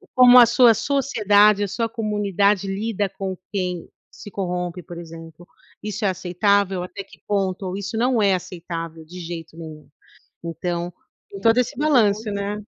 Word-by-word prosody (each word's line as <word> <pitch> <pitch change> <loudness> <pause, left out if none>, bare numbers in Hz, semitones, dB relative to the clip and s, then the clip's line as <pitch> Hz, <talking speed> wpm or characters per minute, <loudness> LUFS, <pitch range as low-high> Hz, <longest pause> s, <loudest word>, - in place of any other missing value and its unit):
como 250 -1 +8
a 240 - +9
sua 235 0 +5
sociedade, 210 -6 +3
a - - -1
sua 230 +3 -1
comunidade 205 -3 0
lida 200 0 -2
com 190 -1 -5
quem 180 -4 -3 0.2
se - - -11
corrompe, 180 -2 -3
por 175 - -10
exemplo, 165 0 -11 0.4
isso 210 +1 -5
é 195 - +3
aceitável? 185 +1 0
Até 190 +2 -7
que 195 - -19
ponto, 190 -2 -2
isso 205 +3 -5
não 245 -1 +2
é 200 -2 +4
aceitável 165 -3 -6
de 180 +3 -11
jeito 165 -1 -8
nenhum. 155 -2 -10 0.6
Então, 175 +1 -4 0.4
em 195 - -8
todo 225 +4 +3
esse 250 +3 0
balanço, 225 -8 +2
né? 200 +1 -3
195 Hz, 155 wpm, -22 LUFS, 180-215 Hz, 0.6 s, a